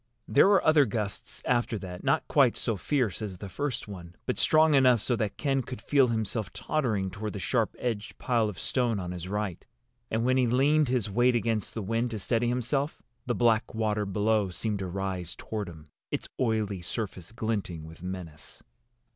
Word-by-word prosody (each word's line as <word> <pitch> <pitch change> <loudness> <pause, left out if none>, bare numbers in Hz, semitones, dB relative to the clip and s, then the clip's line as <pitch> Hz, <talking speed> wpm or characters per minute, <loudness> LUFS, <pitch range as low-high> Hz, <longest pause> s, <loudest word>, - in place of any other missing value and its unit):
There - - +6
were 200 -2 +4
other 155 -2 +6
gusts 105 -3 -4
after 120 -2 +1
that, 90 -2 -7
not - - +1
quite - - +4
so 115 - -1
fierce 125 -1 0
as 100 -4 -5
the 100 - -7
first 140 0 -3
one, 90 -4 -9
but 125 - -1
strong 155 0 +5
enough 130 -4 +6
so 120 +4 +1
that 110 -3 -2
Ken 135 -2 +1
could 125 -1 -7
feel 135 +3 +3
himself 110 -3 -1
tottering 110 -11 -1
toward 105 +3 -5
the - - -4
sharp 115 +2 0
edged 110 -3 -3
pile 115 -4 +1
of 100 - -8
stone 120 -1 0
on 90 -1 -4
his 90 0 -6
right. 105 -3 -3 0.5
And 115 +1 0
when 130 +1 +3
he 125 -2 +3
leaned 140 +5 +3
his 125 -5 +1
weight 120 +4 +3
against 115 -3 -1
the 110 - -3
wind, 115 +4 0
to 115 - -4
steady 115 +4 0
himself, 125 +5 -1 0.2
the 120 - +1
black 115 -2 +2
water 105 -2 0
below 105 +1 +1
seemed 100 +4 -2
to 95 - -3
rise 95 -2 -3
toward 105 -4 -4
him, 80 -3 -12 0.2
its - - -3
oily 110 -6 0
surface 95 -1 -5
glinting 110 -8 -3
with 80 +1 -12
menace. 90 -4 -8
110 Hz, 190 wpm, -28 LUFS, 95-125 Hz, 0.5 s, There